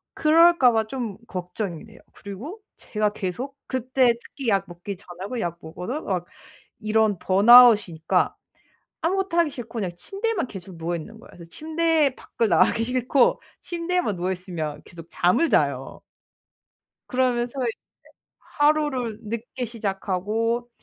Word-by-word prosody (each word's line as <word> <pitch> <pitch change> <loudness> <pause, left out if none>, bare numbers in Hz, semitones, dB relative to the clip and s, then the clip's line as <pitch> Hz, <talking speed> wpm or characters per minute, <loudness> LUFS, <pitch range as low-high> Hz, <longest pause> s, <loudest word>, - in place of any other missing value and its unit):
그럴까 325 -4 +5
봐 220 -1 +1
좀 230 -4 -5
걱정이 180 -1 -5
돼요. - - -16
그리고 250 - -9 0.2
제가 210 -1 -1
계속 240 +9 -5
그때 255 -1 +2
특히 270 -5 -5
약 195 -1 +2
먹기 175 +3 -7
전하고 195 +5 -7
약 170 -1 -3
먹어서 180 - -5
막 180 -3 -2 0.5
이런 215 -2 +2
번아웃이니까 205 -5 +5 0.7
아무것도 370 0 0
하기 335 -3 +4
싫고 240 -2 -9
그냥 185 -4 -2
침대에만 395 - -2
계속 190 -4 -10
누워 170 +1 -2
있는 215 +7 -8
거예요. - - -16
그래서 170 -1 -12
침대에 320 - +1
밖을 230 - -2
나가기 225 - +3
싫고 250 +2 +2 0.2
침대에만 345 - -1
누워 180 +2 -1
있으면 175 -5 -5
계속 165 -1 -12
잠을 240 - +2
자요. - - 0 1.1
그러면서 250 0 0
이제 235 -3 -2 0.6
하루를 290 -7 0
늦게 230 +3 -5
시작하고 220 +2 -2
230 Hz, 305 characters per minute, -24 LUFS, 190-270 Hz, 1.1 s, 그럴까